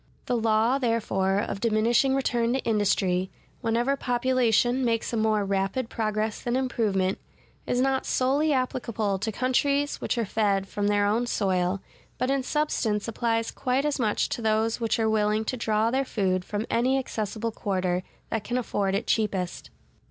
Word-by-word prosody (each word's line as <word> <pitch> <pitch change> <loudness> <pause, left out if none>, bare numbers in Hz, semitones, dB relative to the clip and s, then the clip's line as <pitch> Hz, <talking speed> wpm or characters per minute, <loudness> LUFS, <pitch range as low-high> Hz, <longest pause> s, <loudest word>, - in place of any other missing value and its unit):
The 245 - 0
law, 225 +3 +2
therefore, 210 -6 +1
of 200 -1 -2
diminishing 230 +4 +3
return 240 -3 +1
to 265 - +1
industry, 190 -4 +1 0.3
whenever 240 +3 +1
population 245 -1 +2
makes 230 -1 0
a - - +1
more 215 -2 +1
rapid 195 +5 -1
progress 215 -1 -1
than 240 0 -1
improvement, 210 -7 0 0.5
is 245 - +1
not 265 0 +1
solely 280 +4 +2
applicable 235 -6 -1
to 220 +3 -2
countries 280 +5 0
which - - -1
are 230 - +1
fed 200 -2 0
from 205 0 -2
their 205 0 +2
own 225 +4 +1
soil, 190 -3 0 0.4
but 255 - 0
in 275 -1 +1
substance 255 -7 -1
applies 230 0 -1
quite 265 +1 -1
as 295 -2 0
much 215 -4 +1
to - - -3
those 220 +1 +1
which 230 +1 +1
are 225 -1 +1
willing 215 0 +1
to 255 - -2
draw 220 -1 +1
their 265 +2 +1
food 190 -7 0
from 205 +3 -3
any 255 +3 +2
accessible 225 -3 -3
quarter 185 -4 -1 0.3
that 225 -2 -1
can 245 +4 -2
afford 200 -5 -1
it 200 - -1
cheapest. 195 -5 -1
225 Hz, 165 wpm, -26 LUFS, 205-250 Hz, 0.5 s, diminishing